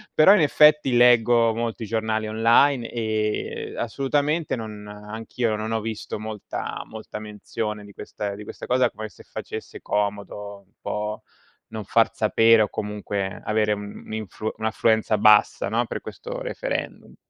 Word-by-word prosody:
però 175 +6 +8
in 200 - +4
effetti 150 -4 +5
leggo 120 -1 +5
molti 115 -1 -3
giornali 110 0 -1
online, 115 +3 +3
ehm, 110 -2 -2
assolutamente 145 +6 0
non 105 -2 -7
anch'io 110 +2 -3
non 110 +1 -4
ho 110 - +1
visto 110 -1 -5
molta 110 -1 -5
molta 110 -1 -8
menzione 105 0 -5
di 100 - -13
questa 100 -1 -5
di 105 - -9
questa - - -8
cosa 125 -1 +3
come 110 0 -7
se - - -17
facesse - - -7
comodo 100 0 -3
un 95 - -37
po' 105 0 -3 0.5
non 110 -1 -6
far 115 +2 +3
sapere, 115 +1 +4
o 105 - -2
comunque 100 -2 -4
avere 105 -1 +1
un'infu 105 +1 -6
un'affluenza 110 0 +1
bassa, 105 -1 +5
no, 115 +2 +1
per - - -4
questo - - -7
referendum. - - -4
110 Hz, 140 wpm, -24 LUFS, 105-120 Hz, 0.5 s, però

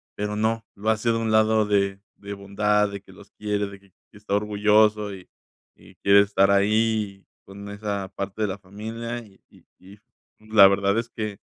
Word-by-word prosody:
pero 105 0 -3
no, 110 +1 0
lo 105 +2 -2
hace 110 +2 0
de 115 - 0
un 115 -1 -1
lado 110 0 +3
de 100 -1 0 0.2
de 100 0 -8
bondad, 105 +1 +1
de 100 -1 -7
que 95 - -18
los 100 +1 -17
quiere, 105 -1 -2
de 100 0 -11
que 100 -1 -25 0.2
que - - -16
está 105 -1 -3
orgulloso 105 0 +2
y 90 - -14 0.5
y - - -19
quiere 100 0 +5
estar 100 -1 +2
ahí 105 0 +1 0.2
con 100 +1 -11
esa 100 -2 -4
parte 100 +2 -4
de - - +1
la 95 - -4
familia, 110 +5 -6
y 100 -2 -22
y - - -22
y 95 +3 -15 0.4
la 110 -2 +6
verdad 100 +2 +1
es 115 0 -5
que 105 -3 -5
105 Hz, 190 wpm, -24 LUFS, 100-110 Hz, 0.5 s, la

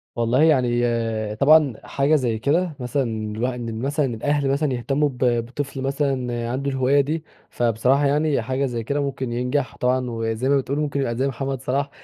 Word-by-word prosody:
والله 120 +5 +2
يعني 125 -6 +3 0.5
طبعًا 145 +2 +5
حاجة 140 +3 +1
زي 120 -6 0
كده 160 +5 +1
مثلًا 125 +2 -1 0.3
الواح 125 +3 0
إن 115 -2 -5
مثلًا 145 +4 0
الأهل 135 +4 0
مثلًا 140 0 +1
يهتموا 135 +5 0
ب 130 - -11 0.3
بطفل 135 +2 -5
مثلًا 130 -4 -1
عنده 140 +3 -2
الهواية 135 +2 +3
دي، 155 +3 -3 0.3
فبصراحة 120 +4 +2
يعني 145 -1 +2
حاجة 130 +4 -1
زي 120 -3 -3
كده 140 +5 -1
ممكن 135 -3 -3
ينجح 125 +3 -1
طبعًا، 125 0 0
وزي 115 +2 -2
ما 140 - +4
بتقول 140 +2 -2
ممكن 145 -2 -1
يبقى 120 -4 -1
زي 130 +3 0
محمد 135 0 -3
صلاح 140 +2 -1
135 Hz, 175 wpm, -22 LUFS, 120-140 Hz, 0.5 s, طبعًا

